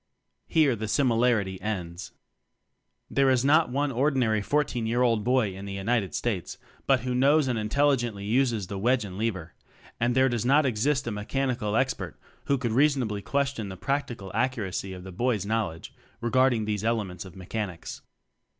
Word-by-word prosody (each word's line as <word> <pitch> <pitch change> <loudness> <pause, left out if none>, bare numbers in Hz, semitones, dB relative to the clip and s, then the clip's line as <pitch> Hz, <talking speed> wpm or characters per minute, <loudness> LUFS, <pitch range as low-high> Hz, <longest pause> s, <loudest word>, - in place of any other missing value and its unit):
Here 150 -6 +3
the 110 0 -4
similarity 115 -5 +1
ends. 90 -4 -4 1.0
There 135 -1 +2
is 130 0 +2
not 155 +2 +4
on 145 0 +1
ordinary 125 -4 +1
fourteen 125 0 0
year 120 +2 +2
old 115 -3 +3
school 105 - -8
boy 120 -7 +2
in 95 +1 -8
the 100 - -5
United 100 +1 -1
States 105 -8 -2 0.3
but 135 -4 +4
who 125 +1 -2
knows 140 +3 +4
and 120 -3 0
intelli 140 +6 +2
gently 110 -5 -4
uses 115 -2 +1
the 95 +1 -5
wedge 120 +2 +2
and 95 -2 -8
lever; 95 -6 -3 0.5
and 120 +1 +1
there 130 0 +5
does 120 -3 -1
not 140 +4 +4
exist 130 +4 +1
a 120 - -2
Mechanical 110 0 -2
Expert 130 0 -1 0.3
who 140 - +2
could 120 -3 -2
reasonably 125 -5 +2
ques 140 +4 0
tion 110 -6 -5
the 95 - -8
practical 120 -5 -3
accuracy 110 -5 -1
of 90 -1 -9
the 95 - -8
boy's 110 +1 0
knowledge 105 -7 -2 0.3
regarding 120 -1 +2
these 105 -1 -2
elements 110 -6 -1
of 95 -3 -12
mechanics. 95 -1 -5
115 Hz, 175 wpm, -27 LUFS, 100-130 Hz, 1.0 s, there